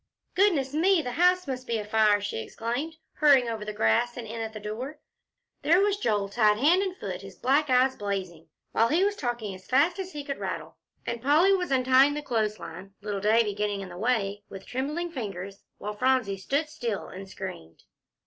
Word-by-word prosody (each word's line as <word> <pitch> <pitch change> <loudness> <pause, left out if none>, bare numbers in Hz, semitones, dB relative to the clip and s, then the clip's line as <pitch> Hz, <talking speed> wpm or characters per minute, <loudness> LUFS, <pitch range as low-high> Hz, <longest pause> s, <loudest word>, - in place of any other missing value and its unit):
"Goodness 325 -9 +2
me, 340 +2 +3
the 245 - -3
house 360 +5 +3
must 255 -2 -5
be 230 - 0
afire!" 210 0 +3
she 205 - -3
exclaimed, 240 - -4 0.2
hurrying 280 -5 +5
over 225 -2 -3
the 210 - -4
grass 210 - +1
and 240 - -5
in 225 +1 -6
at 220 0 -4
the 215 - -8
door. 230 +8 -6 0.6
There 340 +4 +4
was 405 0 +2
Joel, 210 - 0
tied 210 0 +3
hand 320 - +4
and 380 -2 -3
foot, 185 -2 -5
his 195 -1 -11
black 280 +4 +2
eyes 260 +1 +4
blazing, 190 -6 -4 0.2
while 225 - +3
he 330 +9 +2
was 410 +1 +1
talking 240 - -3
as 185 0 -13
fast 305 +8 +3
as 375 -1 -5
he 295 -1 -5
could 280 -1 -5
rattle, - - -5 0.3
and 235 -1 -3
Polly 310 +9 +4
was 365 -2 0
untying 265 +2 +4
the 295 - -4
clothes 220 -5 0
line, 185 +4 -10
little 205 -2 -3
Davie 215 0 +3
getting 205 -1 -2
in 190 - -7
the 175 - -9
way, 205 -3 0
with 195 -1 -9
trembling 300 +7 -3
fingers, 200 - -6 0.2
while 210 +1 -5
Phronsie 255 -3 +1
stood 280 +11 -1
still 240 -9 -4
and 195 +1 -9
screamed. 180 - -8
235 Hz, 200 wpm, -27 LUFS, 205-295 Hz, 0.6 s, hurrying